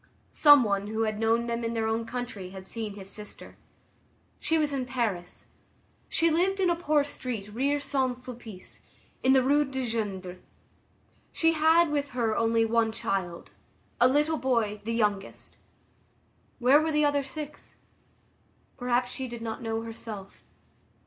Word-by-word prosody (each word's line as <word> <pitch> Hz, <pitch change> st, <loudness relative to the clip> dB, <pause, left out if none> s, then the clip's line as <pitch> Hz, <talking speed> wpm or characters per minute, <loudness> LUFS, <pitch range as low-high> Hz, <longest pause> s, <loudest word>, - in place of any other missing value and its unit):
Some 290 Hz, -3 st, +7 dB
one 200 Hz, -2 st, -1 dB
who 220 Hz, +1 st, -2 dB
had 215 Hz, -1 st, -2 dB
known 225 Hz, +1 st, +2 dB
them 235 Hz, 0 st, -2 dB
in 230 Hz, 0 st, -2 dB
their 225 Hz, -1 st, 0 dB
own 225 Hz, +1 st, -1 dB
country 235 Hz, -6 st, -5 dB
had 190 Hz, 0 st, -10 dB
seen 215 Hz, 0 st, -5 dB
his 195 Hz, -2 st, -9 dB
sister. 210 Hz, +1 st, -11 dB, 0.8 s
She 325 Hz, -, +1 dB
was 300 Hz, -2 st, +1 dB
in 260 Hz, -2 st, -2 dB
Paris. 220 Hz, -9 st, -3 dB, 0.6 s
She 330 Hz, 0 st, +3 dB
lived 375 Hz, +5 st, +1 dB
in 365 Hz, -2 st, +3 dB
a -, -, +2 dB
poor 305 Hz, -3 st, +2 dB
street 235 Hz, -7 st, -6 dB
near 280 Hz, +5 st, +1 dB
Saint 265 Hz, -3 st, -1 dB
Sulpice, 235 Hz, -6 st, -11 dB, 0.4 s
in 260 Hz, -, +4 dB
the 265 Hz, -1 st, +5 dB
Rue 290 Hz, +3 st, +4 dB
du 265 Hz, -2 st, -3 dB
Gindre. 195 Hz, -6 st, -3 dB, 0.9 s
She 325 Hz, 0 st, +2 dB
had 320 Hz, +1 st, +4 dB
with 285 Hz, -1 st, -1 dB
her 225 Hz, -3 st, +1 dB
only 230 Hz, 0 st, +2 dB
one 225 Hz, 0 st, +2 dB
child, 195 Hz, -6 st, -3 dB, 0.5 s
a 245 Hz, -, +7 dB
little 295 Hz, +4 st, +2 dB
boy, 230 Hz, -5 st, 0 dB
the 230 Hz, -, -2 dB
youngest. 205 Hz, -3 st, -2 dB, 1.0 s
Where 265 Hz, +4 st, +5 dB
were 320 Hz, +1 st, 0 dB
the 300 Hz, 0 st, +3 dB
other 290 Hz, -1 st, +2 dB
six? 295 Hz, +2 st, -9 dB, 1.0 s
Perhaps 245 Hz, 0 st, 0 dB
she 260 Hz, 0 st, -4 dB
did 235 Hz, -1 st, -7 dB
not 225 Hz, -1 st, -4 dB
know 225 Hz, -1 st, -2 dB
herself. 220 Hz, -3 st, -8 dB
235 Hz, 155 wpm, -28 LUFS, 220-285 Hz, 1.0 s, Some